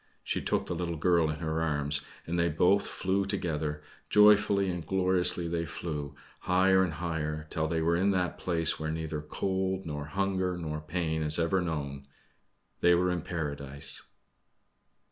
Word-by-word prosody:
She - - -1
took - - 0
the - - -3
little 85 0 -2
girl 85 -1 +3
in 75 +2 -4
her 80 0 -1
arms, 75 -2 0 0.2
and 85 +1 -1
they 85 0 +3
both 90 +6 +3
flew 95 +1 0
together 75 -5 -2 0.3
joyfully 105 -1 +5
and 90 -2 -4
gloriously 90 0 +1
they 85 0 -2
flew 75 -4 -5 0.2
higher 95 +1 +4
and 90 -3 -1
higher, 75 -2 -3
till 80 -1 0
they 80 0 0
were 85 +1 +3
in 95 +3 +2
that 90 -2 0
place 85 -3 +1
where 80 0 -2
neither 80 -1 -3
cold, 95 +4 -2
nor 75 -2 -4
hunger, 95 +2 -1
nor 75 -3 -4
pain 80 0 -2
is 75 0 +3
ever 85 +3 +2
known 70 -5 -4 0.7
they 90 0 +5
were 90 +1 +2
in 90 -1 -1
Paradise. 70 -4 -4
85 Hz, 165 wpm, -30 LUFS, 75-90 Hz, 0.7 s, joyfully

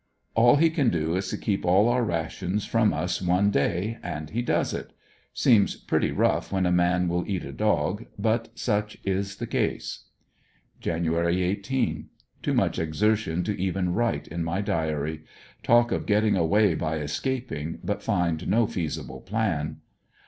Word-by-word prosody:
All 120 +3 +6
he 160 +2 +4
can 145 -6 +2
do 80 -2 0
is 95 +1 -1
to - - -3
keep 100 -2 -1
all 95 +5 +4
our 120 +1 +2
rations 90 +2 -2
from 115 -2 +2
us 90 +3 -2
one 90 +3 +2
day, 100 +5 0
and 75 +1 -5
he 120 - -1
does 120 - 0
it. - - -6 0.4
Seems 110 -5 +3
pretty - - 0
rough - - +1
w^hen 95 -2 +1
a - - +1
man 90 0 +2
will 90 +1 0
eat 95 -4 -2
a 70 - -7
dog, 105 +4 0
but 115 +1 0
such 105 -2 -1
is 95 0 -1
the - - -5
case. - - -2 0.8
26 85 +1 -1
ANDER80NVILLE 80 - +1
DIARY. 85 +1 +2
Jan. 95 - +1
18. 110 +6 -2
— - - -40
Too - - -1
much - - +1
exertion 90 +1 +1
to 105 -4 -3
even 95 -1 0
write 115 +3 0
in 85 +1 -3
ray 95 +4 -1
diary. 80 -3 -2 0.4
Talk 120 0 +4
of - - -2
getting 105 0 +3
away 95 +3 +3
by 80 0 -2
escaping, 80 - -3
but 100 +3 -2
find 90 -3 0
no 115 +2 +3
feasible 85 -6 -4
plan. 85 -8 -2
95 Hz, 175 wpm, -26 LUFS, 85-110 Hz, 0.8 s, All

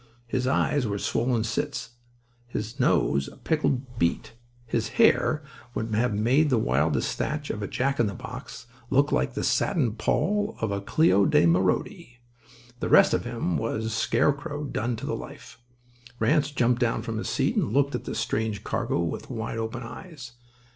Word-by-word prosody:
His 125 +1 -1
eyes 140 -1 +1
were 100 -1 -2
swollen 120 +2 0
slits; 115 +1 -3 0.6
his 115 -1 -5
nose 70 0 +2
a - - -12
pickled 130 -6 -1
beet; 85 +6 0 0.3
his 115 - -1
hair 155 0 +4 0.3
would 110 0 -2
have 110 0 +1
made 130 +9 +3
the 130 - +3
wildest 75 - +1
thatch 150 -1 -2
of 105 - -5
a 100 - -2
Jack 140 +2 -1
in 120 - +3
the 100 - -4
box 125 0 -8 0.2
look 140 +1 +3
like 65 +1 0
the - - -2
satin 130 -10 +1
poll 205 - 0
of 110 -2 -1
a 100 0 -2
Cléo 100 - +3
de - - +5
Mérode. 120 - 0 0.6
The - - -2
rest - - +6
of - - 0
him 115 -10 -1
was 110 +6 -2
scarecrow 145 +5 0
done 120 -4 -2
to 120 +5 -7
the - - -2
life. - - -10 0.6
Ranse 150 -1 +2
jumped 125 -3 +1
down 115 -2 +1
from 115 -2 -3
his - - -3
seat - - 0
and - - +1
looked 140 +3 +2
at - - -4
his - - -3
strange 110 -1 -1
cargo - - -1
with 85 - -4
wide 115 -2 -4
open 115 +2 -4
eyes. 130 0 -9
120 Hz, 175 wpm, -26 LUFS, 110-140 Hz, 0.6 s, rest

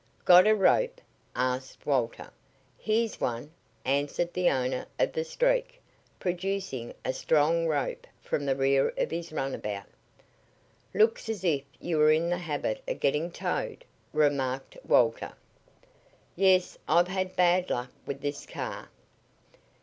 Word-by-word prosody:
"Got 180 +2 +8
a 215 - +6
rope?" - - +3 0.4
asked 130 +1 -2
Walter. 125 -5 -1 0.4
"Here's 225 +1 -1
one," 120 +5 -2 0.3
answered 145 +5 0
the 180 -1 +3
owner 130 -1 -1
of - - +1
the 475 - -1
Streak, - - 0 0.4
producing 180 -8 -3
a 130 - 0
strong 160 +4 +2
rope 145 -3 -2
from 145 - -3
the 135 - +2
rear 135 0 +3
of - - 0
his 170 0 -4
runabout. 105 -9 -3 1.1
"Looks 220 +2 +2
as 210 -5 -3
if 155 -6 +2 0.2
you 165 -3 -1
were 150 0 +6
in 165 +2 +2
the 175 - 0
habit 145 -10 -2
of - - -3
getting 150 +5 +1
towed," - - -3 0.3
remarked 135 -3 0
Walter. 115 -2 +3 1.0
"Yes. 185 -1 +3
I've 175 +3 +4
had 185 0 -2
bad 180 0 +3
luck 125 +1 -2 0.2
with 140 0 -4
this 145 0 -4
car." - - -6
160 Hz, 135 wpm, -28 LUFS, 135-185 Hz, 1.1 s, Got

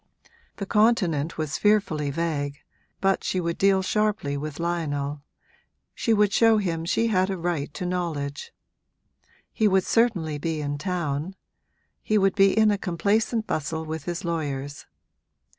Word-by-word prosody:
The 200 - -5
Continent 190 -8 +2
was 155 -2 -2
fearfully 195 -9 +2
vague, 145 -2 -2 0.4
but 195 0 +2
she 185 - -1
would 170 -1 -2
deal 195 -1 +4
sharply 210 -8 0
with 145 +1 -5
Lionel 150 -4 -2 0.7
she 230 - -1
would 210 -2 +3
show 225 0 +5
him 165 -5 -1
she 225 +6 +1
had 190 -2 +2
a 190 - -2
right 170 -4 -2
to 185 - -4
knowledge. 160 -6 -3 1.0
He 220 - +2
would 190 -2 +3
certainly 180 -12 +1
be 160 +1 -2
in 145 -1 -3
town; 170 -1 -2 0.7
he 215 - +1
would 195 -1 +3
be 195 0 +4
in 215 -1 +5
a 205 - 0
complacent 215 +5 0
bustle 160 -1 -3
with 160 -1 -5
his 175 +1 -4
lawyers. 145 -4 -4
175 Hz, 145 wpm, -25 LUFS, 150-200 Hz, 1.0 s, show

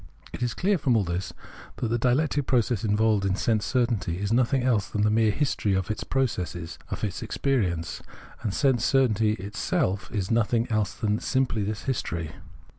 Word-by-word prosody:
It - - -7
is 120 -2 -1
clear 195 -1 +1
from 125 -5 +2
all 105 - +2
this 85 +1 -3 0.4
that 120 - -2
the 120 +1 0
dialectic 135 +3 +1
process 120 -3 +1
involved 105 -1 +2
in 95 -1 +1
sense 110 0 +1
certainty 115 -9 0
is 100 +3 -1
nothing 125 +2 +2
else 115 -6 +2
than 105 - 0
the 105 - +3
mere 110 0 +3
history 105 -5 0
of 95 +1 -1
its 110 - -4
process 90 - -2
— - - -28
of - - -5
its 100 -3 -2
experience; 90 -12 -1 0.4
and 105 - -1
sense 130 -1 +2
certainty 110 -5 +3
itself 100 -1 -2
is 100 -2 -2
nothing 115 +1 +2
else 105 -3 0
than 105 0 0
simply 130 -4 0
this 105 +1 -3
history. 85 - -2
110 Hz, 185 wpm, -26 LUFS, 100-125 Hz, 0.4 s, the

